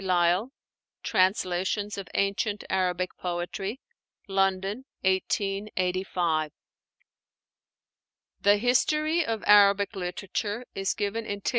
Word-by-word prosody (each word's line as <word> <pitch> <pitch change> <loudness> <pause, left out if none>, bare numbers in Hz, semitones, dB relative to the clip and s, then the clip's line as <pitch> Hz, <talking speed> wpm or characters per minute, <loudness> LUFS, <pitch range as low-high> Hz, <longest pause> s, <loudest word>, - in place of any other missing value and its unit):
Lyall, 180 +4 +2 0.5
'Translations 190 0 +1
of 195 -3 -6
Ancient 200 +1 0
Arabic 185 -1 0
Poetry' 180 +6 -3 0.5
(London, 195 +4 0 0.2
1885). 185 -4 0 1.9
The 205 +1 +5
history 305 +8 +2
of 225 -6 -3
Arabic 200 0 +5
literature 200 +5 -3
is 195 0 -1
given 215 +2 -2
in 205 0 -4
Th. - - -1
195 Hz, 90 wpm, -27 LUFS, 185-210 Hz, 1.9 s, The